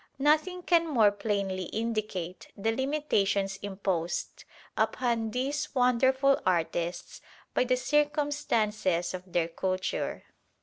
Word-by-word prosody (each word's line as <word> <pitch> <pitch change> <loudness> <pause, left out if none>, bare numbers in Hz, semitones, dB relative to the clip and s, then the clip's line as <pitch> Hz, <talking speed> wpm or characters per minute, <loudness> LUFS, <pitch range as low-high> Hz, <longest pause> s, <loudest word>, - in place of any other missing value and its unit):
Nothing 310 +6 +2
can 335 -1 +3
more 225 -9 +4
plainly 200 -3 -2
indicate 215 -5 -3
the 220 +3 +1
limitations 210 -8 0
imposed 190 -4 -3 0.3
upon 235 -3 0
these 275 +6 -2
wonderful 260 +2 +3
artists 175 -1 -1 0.3
by - - +2
the 255 0 +2
circumstances 255 - +1
of 185 0 -8
their 170 -1 +1
culture. 185 +2 -2
220 Hz, 100 wpm, -29 LUFS, 190-275 Hz, 0.3 s, more